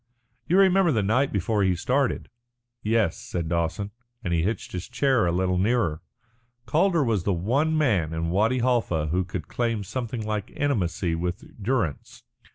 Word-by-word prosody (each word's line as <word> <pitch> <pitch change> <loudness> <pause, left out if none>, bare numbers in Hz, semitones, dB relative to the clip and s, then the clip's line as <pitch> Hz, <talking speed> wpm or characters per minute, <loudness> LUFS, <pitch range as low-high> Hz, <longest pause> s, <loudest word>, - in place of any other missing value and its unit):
You 180 - +3
remember 190 -2 +5
the 110 -6 +1
night 125 +7 +2
before 105 +2 0
he 95 -2 +2
started?" 130 +8 0 0.5
"Yes," 110 -5 +1
said 85 -2 -4
Dawson, 85 +5 -1 0.3
and 85 -4 -1
he 85 - +2
hitched 105 +7 -2
his 90 +4 -5
chair 120 -4 +2
a - - +2
little 90 +1 +1
nearer. 100 -7 +1 0.6
Calder 165 +5 +2
was 110 -8 0
the 100 - +1
one 140 - +1
man 100 - +2
in 80 +1 -2
Wadi 110 +7 +2
Halfa 115 -11 +1
who 90 +4 +1
could 90 -2 -6
claim 115 -3 -1
something 115 +2 -4
like 105 +1 -3
intimacy 95 - 0
with 85 +2 -3 0.2
Durrance. 100 - -2
105 Hz, 165 wpm, -25 LUFS, 90-125 Hz, 0.6 s, remember